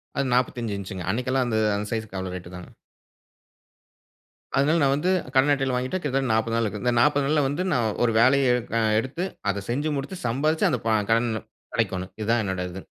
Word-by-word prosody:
அது 140 - 0
45 120 -4 0
இன்ச்சுங்க. 95 -2 -6
அன்னைக்கெல்லாம் 125 +3 0
அந்த 110 -2 +1 0.2
அந்த 105 +1 -3
சைஸ்க்கு 110 -4 -4
அவ்ளோ 95 -1 -4
ரேட்டு 90 0 -9
தாங்க. 90 - -10 1.9
அதனால 150 +5 +3
நான் 135 -1 +4
வந்து, 175 +6 +1 0.2
கடன் 135 +2 +5
அட்டையில 135 -2 0
வாங்கிட்டு 130 +8 -1
கிட்டத்தட்ட 135 -4 0
40 110 +1 0
நாள் 115 - +1
இருக்கு. 105 0 -4
இந்த 125 -1 +2
40 145 +3 +3
நாள்ல 150 +2 +2
வந்து 145 +6 -2
நான் 120 -5 +1
ஒரு 120 - +3
வேலைய 130 +2 +4
எடுக் 125 -2 -3
அ - - +2 0.2
எடுத்து, 135 +10 -3 0.3
அத 100 0 -5
செஞ்சு 145 +6 -1
முடிச்சு, 155 +7 -6
சம்பாரிச்சு 150 +7 +1
அந்த 125 - 0
ப - - +2 0.2
கடன் 115 +1 +3 0.5
அடைக்கோணும். 95 0 -1
இது 105 - -3
தான் 120 -1 +3
என்னோட 95 -1 -2
இது. 95 +2 -9
125 Hz, 195 wpm, -25 LUFS, 110-140 Hz, 1.9 s, கடன்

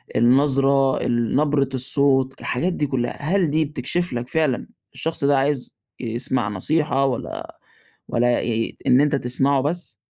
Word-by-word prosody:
النظرة 135 +2 +3
ال 120 -1 0
نبرة 145 -1 +2
الصوت، 135 0 +1
الحاجات 175 +9 -1
دي 150 -4 -1
كُلّها، 120 -3 -3
هل 170 +2 +1
دي 155 +1 +1
بتكشف 150 +5 -1
لك 120 +1 -4
فعلًا 155 -6 0 0.3
الشخص 165 -2 -1
ده 140 0 +3
عايز 135 -1 -1 0.2
يسمع 120 -1 -2
نصيحة 135 - 0
والّا 130 -3 -4 0.6
والّا 120 0 +1
ي 115 -1 -2
إن 125 +1 +5
أنت 145 0 +2
تسمعه 135 +1 +1
بس؟ 170 +6 -3
135 Hz, 145 wpm, -22 LUFS, 125-150 Hz, 0.6 s, إن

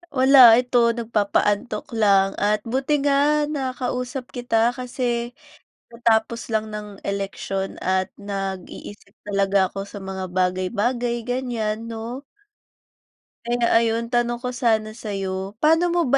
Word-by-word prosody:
Wala, 260 -3 +8
ito 245 -2 +3
nagpapaantok 210 -1 0
lang 195 -3 +3
at 210 +1 +2
buti 265 +5 -1
nga 290 +1 +3
nakausap 255 -2 -3
kita 240 -1 +1
kasi 245 -1 -2 0.6
katatapos 230 0 0
lang 215 0 -1
ng 210 0 -6 0.2
eleksyon 195 -1 -3
at 185 0 0
nag-iisip 195 0 -7
talaga 195 -1 +2
ako 195 - -5
sa 205 - -9
mga 190 -1 -5
bagay-bagay, 200 +7 0
ganyan 230 -3 -2
'no. 230 +4 -6 1.2
Kaya 235 -1 +2
ayun, 230 0 0
tanong 240 0 0
ko 250 - -3
sana 220 -3 0
sa'yo, 195 -3 -4
paano 325 +3 +3
mo 350 - +2
ba 275 - +4
230 Hz, 120 wpm, -22 LUFS, 200-250 Hz, 1.2 s, Wala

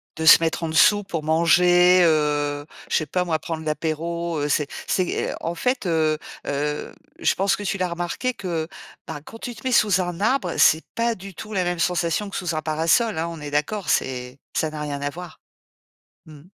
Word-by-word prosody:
De 160 0 -3
se - - +11
mettre 165 +1 -1
en 160 - -1
dessous 205 +6 +5
pour 165 -5 -4
manger, 175 +3 +5
heu, 145 -2 +1 0.2
je - - -1
sais 155 - +1
pas 180 +4 0
moi, 160 -2 0
prendre 160 0 -5
l'apéro, 165 +2 -2
heu, 145 - 0
c'est 150 0 +1 0.2
c'est, 185 -2 0
heu, - - -5
en 170 +1 -3
fait, 250 -1 -1
heu 155 -2 +1 0.3
heu, 150 +1 -3 0.2
je - - +2
pense 195 +1 +1
que 205 - -7
tu 195 -1 -2
l'as 180 -1 0
remarqué 175 +9 -3
que, 170 -5 -3 0.4
bah, 145 - -6
quand 225 - -11
tu 240 -2 -6
te - - -14
mets 255 - 0
sous 205 -5 +4
un 175 0 -4
arbre, 215 -4 +1
c'est 160 +1 +5
pas 230 0 0
du 195 +1 -10
tout 215 +4 -9
la 185 -2 +1
même 175 -1 -2
sensation 175 +3 0
que - - -8
sous 175 -4 -2
un 155 - -1
parasol 165 +7 +1
hein. 165 +1 -1
On 165 -2 -7
est 145 - -5
d'accord, 150 +8 -2
c'est 125 +1 -1 0.2
ça 160 - +1
n'a 155 -1 -7
rien 145 -1 -4
à 145 - -1
voir? 175 +2 -10 0.9
Mmh. 150 -2 -13
170 Hz, 215 wpm, -23 LUFS, 155-185 Hz, 0.9 s, se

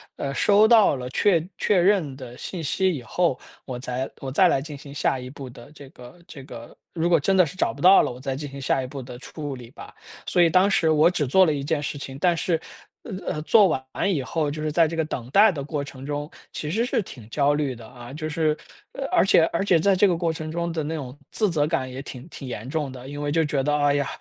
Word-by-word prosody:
呃， 140 -1 -4
收 205 +7 +4
到 220 -9 +5
了 125 -1 -6
确 170 +3 +2
确 205 - +2
认 175 -7 +2
的 125 -2 -10
信 175 -4 -6
息 185 +5 +1
以 135 -6 -6
后， 135 +4 0 0.3
我 130 -2 -5
再 125 +1 -3
我 135 - -5
再 185 +7 +5
来 135 - +2
进 150 0 -8
行 140 0 -11
下 135 -2 0
一 125 0 -8
步 135 -1 -9
的 120 +1 -13
这 140 -3 -13
个 125 +5 -14
这 140 -4 -10
个 120 -3 -11 0.2
如 170 0 0
果 170 -2 +5
真 195 +7 +1
的 185 - +6
是 160 - -8
找 180 - 0
不 140 - -11
到 185 +3 +8
了， - - -1
我 125 - -10
再 135 0 -3
进 145 +1 -6
行 140 0 -9
下 135 0 +1
一 - - -5
步 135 +1 -7
的 125 -1 -9
处 145 0 -6
理 120 -2 -11
吧。 - - -12 0.3
所 175 - +2
以 170 - +5
当 185 +4 +4
时 165 -4 +2
我 155 +1 +5
只 175 -5 -1
做 190 +8 +5
了 155 - +1
一 140 -1 -3
件 145 +1 -1
事 145 0 -4
情， 135 -1 -7
但 175 0 +3
是， 165 0 0 0.4
呃， 195 -8 -5
呃， 150 - -4
做 210 +4 +6
完 135 -6 -1 0.3
以 145 - -1
后， 155 +2 -1
就 155 +1 -5
是 155 0 -1
在 165 +1 +4
这 165 - -5
个 160 - +2
等 125 -5 -6
待 205 +5 +6
的 145 -5 -5
过 145 0 -3
程 135 -1 -10
中， 145 +1 -4 0.2
其 150 - -5
实 225 +6 +1
是 245 - 0
挺 125 - -11
焦 145 +3 +2
虑 145 -3 -1
的 115 -1 -12
啊， 120 +1 -11
就 155 +1 -4
是 155 0 +1 0.4
呃， 275 - -4
而 - - +4
且 170 - +5
而 170 - 0
且 180 -4 +3
在 195 +4 +3
这 200 +2 +4
个 175 -3 +1
过 170 -1 0
程 155 0 -6
中 170 +1 -2
的 160 -2 -2
那 155 +2 -3
种 135 -3 -7
自 210 -2 +1
责 150 -3 +1
感 130 -5 -2
也 130 +1 -6
挺 135 0 -9
挺 140 - -9
严 120 0 -6
重 150 -2 -2
的。 130 0 -10
因 145 +1 -6
为 145 0 -2
就 165 +2 +2
觉 145 -2 0
得： 150 +1 +1
“哎 145 -1 +3
呀， 140 -2 0
150 Hz, 295 characters per minute, -24 LUFS, 135-170 Hz, 0.4 s, 到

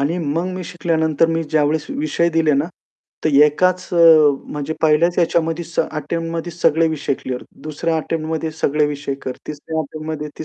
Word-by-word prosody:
आणि 150 +5 0
मग 165 +2 -1
मी 185 -1 -5
शिकल्यानंतर 160 -2 +1
मी 165 0 0
ज्यावेळेस 155 0 +1
विषय 280 - 0
दिले 160 -2 +2
ना, 140 +2 +1 0.6
तर - - +3 0.2
एकाच 180 +5 +1
अ, - - 0 0.6
म्हणजे 150 +2 -3
पहिल्याच 160 +3 +3
ह्याच्यामध्ये 165 -1 +1
स 170 - -11
अटेम्प्टमध्ये 165 +2 -3
सगळे 165 0 +2
विषय 145 -3 -1
क्लिअर. 125 -1 -4 0.2
दुसऱ्या 160 +2 -2
अटेम्प्टमध्ये 160 0 -2
सगळे 150 +1 +2
विषय 145 -1 -3
कर, 130 - -3
तिसऱ्या 155 +2 -5
अटेम्प्टमध्ये 155 0 -5
ती - - -5
160 Hz, 160 wpm, -19 LUFS, 150-165 Hz, 0.6 s, तर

